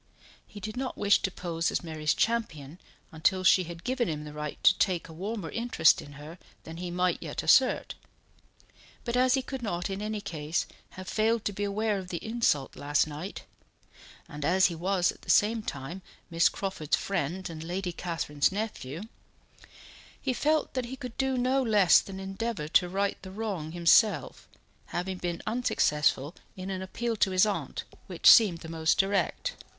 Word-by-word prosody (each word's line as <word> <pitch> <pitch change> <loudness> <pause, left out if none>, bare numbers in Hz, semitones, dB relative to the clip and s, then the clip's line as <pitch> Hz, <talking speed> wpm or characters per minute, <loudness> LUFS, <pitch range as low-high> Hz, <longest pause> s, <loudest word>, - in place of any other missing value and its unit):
He 205 - -11
did 215 +2 -6
not 255 0 -4
wish 205 0 +3
to - - 0
pose 170 -3 -2
as - - -2
Mary's 155 -2 -1
champion 175 -10 -1 0.3
until 175 +4 +1
she 185 0 +5
had 170 0 -9
given 250 -3 0
him 150 -1 -4
the 150 -1 -9
right 150 -1 -5
to - - +7
take 180 -3 +1
a 160 - -11
warmer 195 +1 -5
interest 230 -9 +3
in 145 - -12
her 150 +5 -11 0.2
than 165 0 -9
he 180 0 -5
might 180 +1 0
yet - - -4
assert; - - +4 1.1
but 235 -1 -2
as 255 +1 +4
he 265 - -1
could 265 0 -6
not 180 -4 -3
in 195 +1 -4
any 215 0 -3
case 160 -4 -2 0.3
have 185 0 -8
failed 225 +1 +1
to 205 - -1
be 205 - -3
aware 205 0 0
of 185 - -8
the 180 - -4
insult 220 - 0
last 145 +1 +1
night, 155 +6 -7 0.8
and 145 0 -7
as 190 +5 +4
he 175 - +2
was 180 +2 +1
at - - -17
the - - -14
same 220 +2 +4
time 155 +1 -6 0.3
Miss 165 +1 +4
Crawford's 190 -6 -2
friend 185 0 -2
and 160 -1 -7
Lady 180 +2 -3
Catherine's 165 -4 -1
nephew, 190 -7 -4 1.2
he 265 - -1
felt 305 +4 +1
that 255 -2 -2
he 250 +2 -6
could 250 -3 -8
do 265 -1 +1
no 255 +2 +2
less 210 -7 +5
than 190 -1 -8
endeavour 195 -2 -4
to 180 +2 +3
right 200 +2 -1
the 190 - -9
wrong 190 -6 -4
himself, 175 - +3 0.4
having 180 +1 -4
been 175 -1 -4
unsuccessful 150 - +1 0.2
in 185 +1 -5
an 185 -1 -4
appeal 230 +5 -3
to 195 - +3
his 185 +1 +4
aunt, 210 -2 -3 0.2
which - - 0
seemed 195 -8 +6
the 165 - -8
most 160 -1 +1
direct. 200 - 0
190 Hz, 180 wpm, -28 LUFS, 165-215 Hz, 1.2 s, to